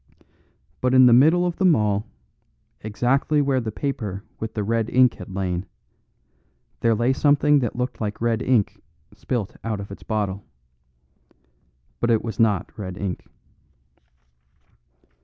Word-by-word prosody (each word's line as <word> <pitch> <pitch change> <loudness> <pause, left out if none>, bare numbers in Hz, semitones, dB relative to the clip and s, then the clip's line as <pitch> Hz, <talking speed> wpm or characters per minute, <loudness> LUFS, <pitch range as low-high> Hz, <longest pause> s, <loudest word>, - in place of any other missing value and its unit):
But 130 0 +2
in 130 0 +8
the 120 - +6
middle 160 +8 +5
of 175 -1 -2
them 185 -4 +4
all, 105 -1 0 0.7
exactly 125 +7 0
where 140 -2 +1
the 110 -2 -4
paper 105 -7 -4 0.2
with 110 0 -5
the 105 - -1
red 115 +1 -1
ink 130 -1 +4
had - - -11
lain, 95 -1 -3 1.1
there 115 -1 +2
lay 120 +4 +1
something 145 +1 +3
that 120 -5 -2
looked 125 0 -4
like 105 -1 -3
red 115 0 0
ink 125 -6 +1 0.3
spilt 115 -6 -4
out 110 -3 -3
of 100 0 -8
its 100 - -10
bottle. 100 -2 -3 1.6
But 120 - 0
it 115 -2 +2
was 115 +1 -6
not 105 -4 +1
red 95 -3 -6
ink. 95 -3 -5
115 Hz, 140 wpm, -23 LUFS, 105-130 Hz, 1.6 s, in